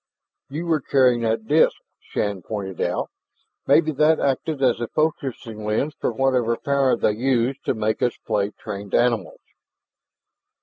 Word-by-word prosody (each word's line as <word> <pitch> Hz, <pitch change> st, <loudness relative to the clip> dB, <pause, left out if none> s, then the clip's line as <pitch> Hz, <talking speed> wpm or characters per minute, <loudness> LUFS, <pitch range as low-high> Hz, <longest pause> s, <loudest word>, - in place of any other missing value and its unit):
"You 155 Hz, +5 st, -4 dB
were 160 Hz, -3 st, +1 dB
carrying 125 Hz, -3 st, +3 dB
that 110 Hz, -1 st, -1 dB
disk," 150 Hz, +7 st, +3 dB, 0.2 s
Shann 100 Hz, -3 st, -3 dB
pointed 95 Hz, -1 st, -5 dB
out. -, -, -1 dB, 0.6 s
"Maybe 155 Hz, -1 st, +4 dB
that 155 Hz, +2 st, +3 dB
acted 140 Hz, +2 st, -1 dB
as 125 Hz, -3 st, +3 dB
a 120 Hz, -, -1 dB
focusing 130 Hz, -8 st, -2 dB
lens 110 Hz, +8 st, -1 dB
for -, -, 0 dB
whatever 125 Hz, -1 st, +1 dB
power 140 Hz, -2 st, +1 dB
they -, -, +2 dB
use 125 Hz, +3 st, +1 dB
to -, -, 0 dB
make 110 Hz, 0 st, -1 dB
us 120 Hz, -, 0 dB
play 105 Hz, -2 st, 0 dB
trained 100 Hz, -1 st, -6 dB
animals." 120 Hz, -6 st, +1 dB
120 Hz, 145 wpm, -23 LUFS, 110-140 Hz, 0.6 s, Maybe